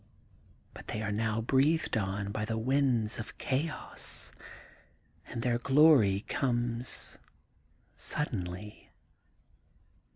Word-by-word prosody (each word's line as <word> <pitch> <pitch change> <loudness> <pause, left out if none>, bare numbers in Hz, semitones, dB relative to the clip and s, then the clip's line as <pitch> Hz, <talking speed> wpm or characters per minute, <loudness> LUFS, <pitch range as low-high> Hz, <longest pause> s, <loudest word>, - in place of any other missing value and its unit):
But - - -11
they 105 - -3
are 105 - -1
now 110 +1 0
breathed 140 +7 +2
on 100 -1 -1
by 110 +1 -2
the 110 +1 -2
winds 125 -2 +1
of 115 - -7
chaos 150 +4 -3 1.0
and 115 - -5
their 120 -1 +1
glory 135 -7 +5
comes 120 -1 -2 0.8
suddenly. 105 -7 -4
115 Hz, 95 wpm, -31 LUFS, 105-135 Hz, 1.0 s, glory